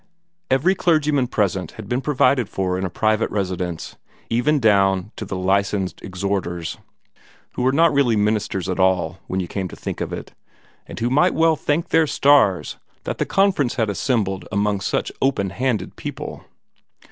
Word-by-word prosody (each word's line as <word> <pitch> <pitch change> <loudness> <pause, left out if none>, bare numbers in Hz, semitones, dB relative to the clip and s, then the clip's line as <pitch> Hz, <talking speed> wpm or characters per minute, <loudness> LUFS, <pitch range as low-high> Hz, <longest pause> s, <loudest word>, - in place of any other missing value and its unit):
Every 135 +8 +3
clergyman 150 -7 +2
present 95 -7 -1
had 110 -3 -9
been 125 +4 -1
provided 135 -4 +2
for 95 -1 -1
in 95 +1 -2
a - - -2
private 110 +5 +1
residence 90 -4 -3 0.3
even 140 +6 +2
down 100 -3 +3
to 110 - -6
the 95 - -5
Licensed 95 +1 0
Exhorters, 95 -4 -3 0.7
who - - -4
were 130 +1 +3
not 165 +3 +4
really 135 -5 +3
ministers 105 -3 0
at 95 0 -2
all 95 0 +1
when 95 - -2
you 90 - -2
came 95 +1 -3
to - - -10
think - - -5
of - - -3
it, - - -7 0.5
and - - -8
who 120 +2 0
might 165 +7 +3
well 165 0 +4
thank 150 +2 -1
their 160 -1 +3
stars 140 -11 +3 0.3
that - - -4
the - - 0
Conference 190 -11 +2
had 110 -5 0
assembled 95 -3 -1
among 100 0 0
such - - -1
open 115 -9 +1
handed 125 +1 -2
people. - - -7
105 Hz, 170 wpm, -21 LUFS, 95-135 Hz, 0.7 s, not